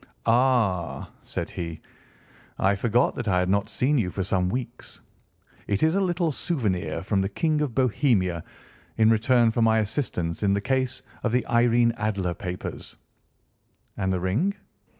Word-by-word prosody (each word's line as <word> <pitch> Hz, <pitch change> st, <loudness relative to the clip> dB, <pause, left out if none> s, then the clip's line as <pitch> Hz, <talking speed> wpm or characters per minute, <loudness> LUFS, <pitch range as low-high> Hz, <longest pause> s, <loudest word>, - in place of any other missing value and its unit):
"Ah," 115 Hz, -8 st, +1 dB
said -, -, -4 dB
he, 85 Hz, -2 st, -5 dB, 0.8 s
"I 100 Hz, +1 st, +3 dB
forgot 120 Hz, +5 st, +1 dB
that 120 Hz, -, -5 dB
I 90 Hz, -2 st, +2 dB
had 90 Hz, 0 st, +1 dB
not 100 Hz, +1 st, +1 dB
seen 140 Hz, +2 st, +1 dB
you 95 Hz, -5 st, 0 dB
for 95 Hz, +1 st, -3 dB
some 90 Hz, -1 st, 0 dB
weeks. 125 Hz, +2 st, -6 dB, 0.7 s
It 100 Hz, +5 st, 0 dB
is 160 Hz, +1 st, +4 dB
a 195 Hz, -, +2 dB
little 175 Hz, -3 st, 0 dB
souvenir 95 Hz, -, -2 dB
from 100 Hz, 0 st, +1 dB
the 95 Hz, -, -1 dB
King 155 Hz, +8 st, 0 dB
of 135 Hz, -7 st, -2 dB
Bohemia 110 Hz, -, +1 dB, 0.5 s
in 110 Hz, 0 st, +5 dB
return 115 Hz, +1 st, +3 dB
for 115 Hz, -, -1 dB
my 110 Hz, 0 st, +4 dB
assistance 105 Hz, -, -2 dB
in 100 Hz, -1 st, +2 dB
the -, -, +1 dB
case 130 Hz, +3 st, -1 dB, 0.2 s
of 120 Hz, -, 0 dB
the 125 Hz, +1 st, +1 dB
Irene 120 Hz, 0 st, +3 dB
Adler 100 Hz, -5 st, -1 dB
papers." 90 Hz, 0 st, -7 dB, 1.0 s
"And 95 Hz, 0 st, -1 dB
the 90 Hz, -, 0 dB
ring?" 120 Hz, -, 0 dB
110 Hz, 160 wpm, -25 LUFS, 95-125 Hz, 1.0 s, in